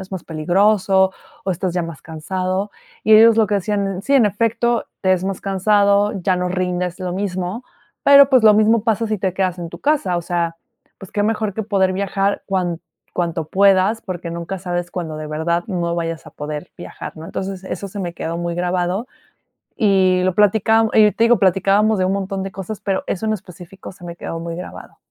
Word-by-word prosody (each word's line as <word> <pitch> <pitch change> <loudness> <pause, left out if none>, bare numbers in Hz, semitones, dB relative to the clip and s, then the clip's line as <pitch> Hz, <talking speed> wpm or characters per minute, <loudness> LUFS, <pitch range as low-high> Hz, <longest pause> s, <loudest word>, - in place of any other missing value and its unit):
Es 190 0 -10
más 185 - -5
peligroso, 190 +4 +2 0.3
o, 195 - -1
estás 180 +1 -2
ya 175 - 0
más 165 -3 -8
cansado 185 +5 -3 0.3
y 220 - +6
ellos 225 +1 +7
lo 220 -2 +4
que 205 - -1
hacían, 195 -1 -2
sí, 275 - -2
en 240 -6 +5
efecto, 230 +3 0 0.2
te 185 0 +3
es 185 - 0
más 195 -1 -3
cansado, 200 +1 +2
ya 185 +1 +1
no 180 0 -1
rindes 180 0 -2
lo 180 -1 -3
mismo, 190 +3 -3 0.4
pero, 280 0 +8
pues, 255 -3 +5
lo 210 -1 +8
mismo 215 +1 +3
pasa 225 0 +1
si 215 -2 -2
te 190 -1 -1
quedas 185 -2 -1
en 170 - -5
tu - - -9
casa, 280 -12 +1
o - - -5
sea, 170 -1 -2 0.4
pues, 195 - -12
qué 205 - 0
mejor 215 -2 -1
que 220 - -2
poder 195 -3 +1
viajar 195 +1 -1
cuan 180 -4 -1 0.3
cuanto 170 -2 -1
puedas, 195 +4 +3
porque 175 -3 -6
nunca 170 +3 -5
sabes 175 -1 -3
cuando 160 -4 -4
de 155 0 -6
verdad 170 +3 -1
no 170 -4 -2
vayas 165 -1 -4
a - - -10
poder 150 +3 -6
viajar, 175 - -9
¿no? 160 - -9
Entonces, 190 0 -5
eso 200 +1 -5
se 205 - -8
me 175 -2 -4
quedó 165 +1 -4
muy 170 0 -3
grabado. 180 +5 -1 0.7
Y 190 -3 +3
lo 185 -1 +1
platicábam 220 +2 +3
y 210 -1 +6
te 230 - +2
digo 240 -1 +5
platicábamos 195 +3 +3
de 185 - +2
un 190 - +1
montón 195 0 -3
de 195 - -5
cosas, 195 +2 -6
pero 195 -2 -1
eso 200 +3 -2
en 215 - +1
específico 185 -1 -10
se 180 - -17
me 170 0 -7
quedó 165 -1 -6
muy 165 0 -5
grabado. 180 - -9
190 Hz, 210 wpm, -19 LUFS, 175-205 Hz, 0.7 s, pero